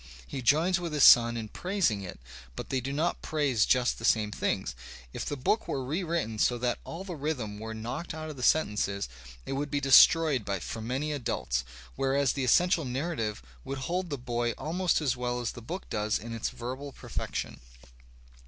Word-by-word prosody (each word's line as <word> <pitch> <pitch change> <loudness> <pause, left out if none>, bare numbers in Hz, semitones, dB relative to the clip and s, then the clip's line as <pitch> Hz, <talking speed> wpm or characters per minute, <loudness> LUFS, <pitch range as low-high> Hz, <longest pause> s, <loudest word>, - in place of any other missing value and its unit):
He 135 - -5
joins 160 +9 +3
with 170 -3 -4
his 150 - +3
son 120 0 +8
in 110 -2 -5
praising 180 - 0
it, 95 - -8 0.4
but - - -6
they 130 -1 0
do 135 +3 -4
not 155 +5 -1
praise 140 -8 +1
just 125 -1 +2
the - - -10
same 105 -2 +3
things. - - -1 0.4
If - - -4
the 145 - -3
book 210 - 0
were 135 -2 -2
rewritten 160 - -2
so 120 - +3
that 120 0 -1
all 170 +3 -7
the 185 -3 -6
rhythm 130 -9 -3
were 110 0 -6
knocked 120 +9 -5
out 155 0 -5
of 155 - -6
the 130 - -8
sentences, 105 -8 +1 0.4
it - - -5
would 145 +2 -2
be 145 - 0
de 135 -1 -2
stroyed 150 -8 +6
for 115 - -5
many 130 +7 -2
adults, 65 - -1 0.3
whereas 135 -1 +2
the 140 - -2
essential 170 +6 +4
narrative 125 - -3 0.2
would 135 - -4
hold 175 +7 -2
the 145 - -3
boy 120 -1 -1
almost 175 +2 0
as 135 -4 +1
well 125 0 -2
as 120 - -2
the 120 - -10
book 175 +11 -6
does 105 0 0
in 115 +1 -7
its 115 - -2
verbal 130 +4 -6
perfection. - - -5
130 Hz, 195 wpm, -29 LUFS, 115-155 Hz, 0.4 s, son